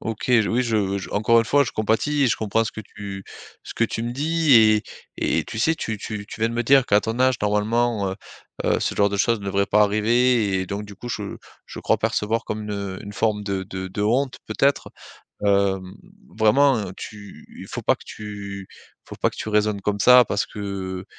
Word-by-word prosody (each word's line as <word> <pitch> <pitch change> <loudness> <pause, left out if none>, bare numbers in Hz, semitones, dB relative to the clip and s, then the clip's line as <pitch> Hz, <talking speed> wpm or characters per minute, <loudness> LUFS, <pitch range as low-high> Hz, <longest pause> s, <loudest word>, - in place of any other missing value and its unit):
OK, 110 +2 -4
j 115 -4 +4
oui, 125 +3 +1
je 105 -4 0
j 95 - -7
encore 110 +3 +3
une 115 - +3
fois, 140 +6 +3
je 120 - -4
compatis 115 +7 0
et - - +4
je 110 -4 +1
comprends 110 +1 0
ce 110 - -5
que - - -7
tu 100 -2 -8 0.4
ce - - -9
que 115 - +2
tu 115 - -3
me 120 - -3
dis 155 +4 +1
et 110 -2 +6 0.4
et - - 0
tu - - -7
sais, 160 +8 +2
tu 110 -8 -4
tu 105 0 -6
tu 110 - -10
viens 110 - +2
de 115 - -5
me 120 - 0
dire 135 +1 +4
qu'à 100 +1 +4
ton 115 +3 -3
âge, 130 0 +4
normalement, 105 +1 +1
heu 95 - -6 0.5
heu, - - +2
ce - - -1
genre 100 - +3
de 100 - -2
choses 115 +3 +2
ne - - -9
devrait 100 0 +1
pas 105 +1 +4
arriver 110 +1 +2
et 95 - -3
donc 100 +2 -4
du 100 - -11
coup, 120 - -8
je 105 -4 -5 0.3
je - - -9
crois - - +1
percevoir 110 +2 0
comme 110 0 -4
une 100 -2 -4
une 100 -1 -8
forme 105 -1 -1
de 100 -2 -2
de 95 0 -6
de 100 +2 -4
honte, 130 +5 0
peut-être. 140 +6 +1 0.5
Hem, 100 -2 +1 0.4
vraiment, 135 +5 +4
heu, 100 -4 -5
tu 105 -2 -11
faut - - -5
pas - - +3
que - - -17
tu 100 -2 -8 0.4
faut - - -9
pas - - +1
que - - -15
tu - - -5
raisonnes 105 -1 +1
comme 100 +1 -1
ça 125 +4 +8
parce 100 - 0
que, 95 -3 -5
105 Hz, 225 wpm, -23 LUFS, 100-115 Hz, 0.5 s, ça